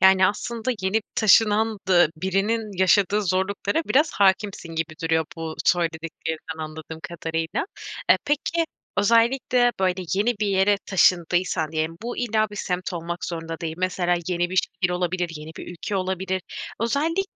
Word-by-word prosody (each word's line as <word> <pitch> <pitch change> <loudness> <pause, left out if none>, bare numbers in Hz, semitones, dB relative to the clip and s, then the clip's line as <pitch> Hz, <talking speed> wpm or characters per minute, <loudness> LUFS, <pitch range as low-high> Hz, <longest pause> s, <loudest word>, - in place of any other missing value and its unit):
Yani, 190 0 +6
aslında 230 +4 -2
yeni 190 +4 +1
taşınan 215 0 +4
da 175 -4 +6
birinin 195 +3 -1
yaşadığı 200 +2 +4
zorluklara 200 - 0
biraz 300 +3 +2
hâkimsin 190 -3 +1
gibi 160 0 -2
duruyor 160 0 +2
bu 160 -1 -5
söylediklerden 160 -1 -1
anladığım 160 +1 -7
kadarıyla. 165 - -3 0.4
E, - - +8
peki 300 +3 0 0.3
özellikle, 240 +3 +3
böyle, 185 0 +1
yeni 215 +5 +2
bir 210 - +2
yere 195 +1 +3
taşındıysan 175 -3 +2
diyelim, 160 +1 -1
bu 240 +1 -4
illa 220 -3 +1
bir 210 - -9
semt 180 0 -2
olmak 170 +1 -4
zorunda 165 0 -5
değil. 160 -1 -3
Mesela 180 -1 +1
yeni 175 -1 0
bir 185 - -4
şehir 180 0 0
olabilir, 180 0 -1
yeni 150 +1 -9
bir - - -8
ülke 185 +3 -4
olabilir. 190 0 -2 0.4
Özellikle 300 +10 +1
185 Hz, 145 wpm, -24 LUFS, 170-210 Hz, 0.4 s, E